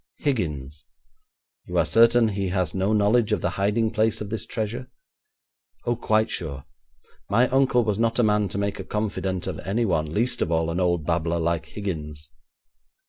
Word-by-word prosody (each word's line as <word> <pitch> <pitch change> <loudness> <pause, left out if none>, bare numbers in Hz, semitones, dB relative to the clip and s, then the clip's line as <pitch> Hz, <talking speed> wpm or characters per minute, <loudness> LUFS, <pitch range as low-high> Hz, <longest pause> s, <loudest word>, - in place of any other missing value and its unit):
'Higgins.' 75 - -2 0.8
'You - - -3
are - - +4
certain 115 0 +5
he 100 -2 -2
has 90 -3 -1
no 95 +2 0
knowledge 105 +2 +3
of 105 - +1
the 90 - 0
hiding 105 +4 +1
place 110 0 +1
of 105 -1 -6
this 110 -3 -4
treasure?' 115 +3 -4 1.0
'Oh, 120 0 +1
quite 110 -1 +1
sure. 70 -5 -4 0.6
My 115 +6 +4
uncle 130 -2 +3
was 105 -2 -1
not 115 0 +1
a 120 - +4
man 105 -2 +2
to 95 - -4
make 100 0 -2
a - - -4
confidant 100 -3 -2
of - - -4
anyone, 95 -7 0
least 120 +7 0
of 85 - 0
all 80 0 +1
an 85 - -2
old 85 -4 +1
babbler 85 0 0
like 85 0 -1
Higgins.' 75 -6 -5
100 Hz, 175 wpm, -24 LUFS, 85-110 Hz, 1.0 s, certain